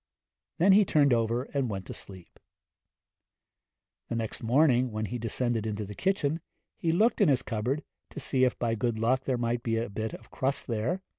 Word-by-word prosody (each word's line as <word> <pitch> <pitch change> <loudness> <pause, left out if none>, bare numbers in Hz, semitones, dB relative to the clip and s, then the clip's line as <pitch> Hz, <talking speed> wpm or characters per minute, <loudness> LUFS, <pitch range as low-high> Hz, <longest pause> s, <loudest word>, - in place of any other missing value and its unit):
Then 180 +4 +5
he 205 +2 +7
turned 145 -7 +3
over 115 +1 +1
and 135 -4 0
went 95 -2 -4
to - - -7
sleep. 95 -3 -8 1.7
The - - -2
next 115 -2 -4
morning, 125 0 +3
when 110 0 -2
he 120 +3 -4
descended 115 0 -1
into 105 -1 -3
the 105 - -8
kitchen, 165 - 0 0.3
he 165 - 0
looked 220 +7 +2
in 195 - +5
his 130 -2 +2
cupboard, 125 +6 -2 0.3
to - - -8
see 130 -2 +1
if 125 - +2
by 115 -2 0
good 115 0 -1
luck 130 +4 +1
there 130 -2 0
might 120 0 -1
be 115 -1 -1
a 115 -2 -2
bit 110 +2 -3
of - - -15
crust 135 +1 -1
there. 120 - -2
120 Hz, 195 wpm, -29 LUFS, 110-140 Hz, 1.7 s, he